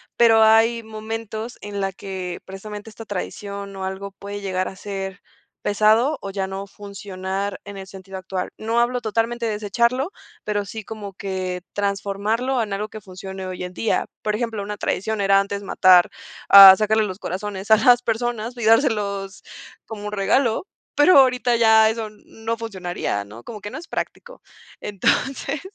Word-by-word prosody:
Pero, 225 -2 +5
hay 225 +1 +5
momentos 220 +1 -6
en 205 -1 -5
la 195 0 -1
que 190 -2 -6
precisamente 205 +3 -8
esta 225 +1 -11
tradición 200 0 -6
o 190 - -6
algo 190 +1 -5
puede 200 +1 -7
llegar 185 -1 -1
a - - -11
ser 195 -1 -6 0.4
pesado 220 +8 +3
o 195 - -5
ya 195 -1 -2
no 195 +1 -5
funcionar 195 0 -5
en 200 0 -8
el 190 0 -8
sentido 190 0 -9
actual. 185 0 -4
No 225 +2 0
hablo 245 +1 +1
totalmente 230 +2 -1
de 220 - -1
desecharlo, 235 - 0 0.3
pero 205 -1 -1
sí 215 +2 -7
como 210 -3 -7
que 185 -2 -4
transformarlo 205 +6 -1
en 210 - -7
algo 200 +2 -2
que 215 0 -10
funcione 190 0 -8
hoy 185 -1 -5
en 180 - -8
día. 225 - 0 0.2
Por 210 - -1
ejemplo, 225 -2 -3
una 210 +1 -5
tradición 220 +3 -2
era 195 0 +4
antes 200 0 -4
matar, 185 -2 +5 0.4
ah, 195 -1 +12
sacarle 215 +1 +2
los 190 -2 -5
corazones 195 +1 -5
a 220 - +9
las 245 +3 +5
personas 235 0 -2
y 240 - -6
dárselos 210 -5 +1 0.4
como 210 -2 -6
regalo, 220 - +1 0.3
pero 295 +4 +6
ahorita 250 -2 +3
ya 220 -1 +6
eso 220 -1 -3
no 225 +2 -6
funcionaría, 185 - -4
¿no?, 110 +4 -12
como 220 -3 -8
que 205 - -7
no - - -7
es 325 +1 -10
práctico. - - -6 0.4
Entonces, 270 +7 -1
205 Hz, 170 wpm, -22 LUFS, 195-225 Hz, 0.4 s, ah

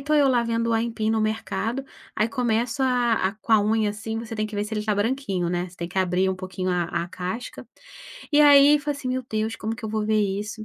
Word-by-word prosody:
tô 300 +2 0
eu 290 -2 +5
lá 245 -2 +3
vendo 230 0 -1
o - - +2
aipim 225 -1 0
no 220 -1 +1
mercado. 225 +4 -2 0.3
Aí 215 - +2
começo 235 +2 -1
a 245 -2 +2 0.2
a - - -6
com 220 +1 -3
a 215 - +7
unha 215 0 +1
assim 220 +2 -5
você 225 0 -6
tem 215 0 -1
que 210 -1 -7
ver 205 - 0
se 215 - -9
ele 210 - -1
está 210 0 0
branquinho 205 -5 -1
né, 175 +1 -2
você 180 - -18
tem 170 -1 -5
que 185 +2 -3
abrir 185 +1 +1
pouquinho 185 0 -4
a 175 -1 +1 0.2
a - - -5
casca. 185 +7 -6 0.6
E 295 - +5
aí 290 0 +7
falei 290 0 -3
assim: 260 -3 -5
"Meu 255 0 -2
Deus, 220 +1 -2
como 220 +1 -3
que 225 - -10
eu - - -3
vou 215 0 -2
ver 215 -1 +2
isso?". 205 +2 -3
220 Hz, 255 wpm, -24 LUFS, 205-240 Hz, 0.6 s, a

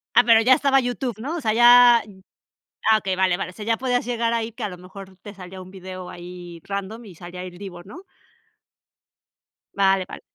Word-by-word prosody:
Ah, 240 - +8
pero, 230 -1 +6
ya 255 +3 +5
estaba 270 0 +3
YouTube, 245 -2 -4
¿no? 305 +8 -4
O - - -4
sea, 220 -5 0
ya 240 +1 +7 0.9
ah, 220 - +6
okey, 190 -3 -2
vale, 185 -1 +1
vale. 190 - -4
O - - -19
sea, 210 +1 -9
ya 225 0 +1
podías 245 -2 -1
llegar 235 -1 -1
ahí, 230 0 -2
que 230 - -8
a 210 - -2
lo 180 - -9
mejor, 190 +1 -13
te 205 +2 -11
salía 185 -1 -10
un 185 0 -12
video 185 -1 -9
ahí 175 -1 -10
random, 200 +4 -6
y 185 - -13
salía 180 +2 -9
Il 175 -1 -10
Divo, 175 -3 -9
¿no? 335 - -12 1.7
Vale, 195 -1 +2
vale. - - -9
200 Hz, 210 wpm, -22 LUFS, 185-240 Hz, 1.7 s, Ah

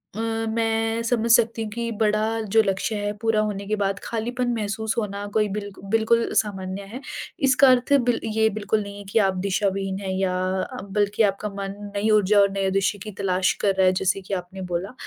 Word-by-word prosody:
अ, 220 - -5 0.3
मैं 225 0 0
समझ 230 -1 0
सकती 230 0 +4
हूँ 215 - -5
कि 235 +1 -3
बड़ा 215 +1 +1
जो 225 - +7
लक्ष्य 195 +2 -1
है 205 0 -2
पूरा 225 -1 +2
होने 205 -2 -3
के 215 - +1
बाद 195 -1 -1
खालीपन 245 +2 -2
महसूस 220 0 -2
होना 205 -2 -2
कोई 215 -1 +2
बिल्क 205 -1 -6
बिल्कुल 225 +1 +2
सामान्य 195 -2 -1
है, 230 +7 -9 0.4
इसका 270 0 +5
अर्थ 255 +2 +3
बिल 245 -2 +2
ये 220 0 +2
बिल्कुल 215 0 -1
नहीं 200 0 -9
है 205 - -8
कि 225 - +3
आप 190 -2 +2
दिशा 200 +1 +1
विहीन 195 0 -3
हैं 190 -1 -3
या 185 -1 +1 0.6
बल्कि 205 +2 +1
आपका 205 +1 0
मन 195 0 -4 0.2
नई 210 +2 +1
ऊर्जा 210 -1 +4
और 200 0 +5
नये 195 -1 0
दृश्य 195 +2 +1
की 215 - -7
तलाश 185 -1 +1
कर 195 -1 +2
रहा 190 0 +3
है 185 - +4
जैसे 190 +1 +1
कि 195 +1 -7
आपने 185 +1 -5
बोला। 185 +7 -2
210 Hz, 205 wpm, -24 LUFS, 195-225 Hz, 0.6 s, जो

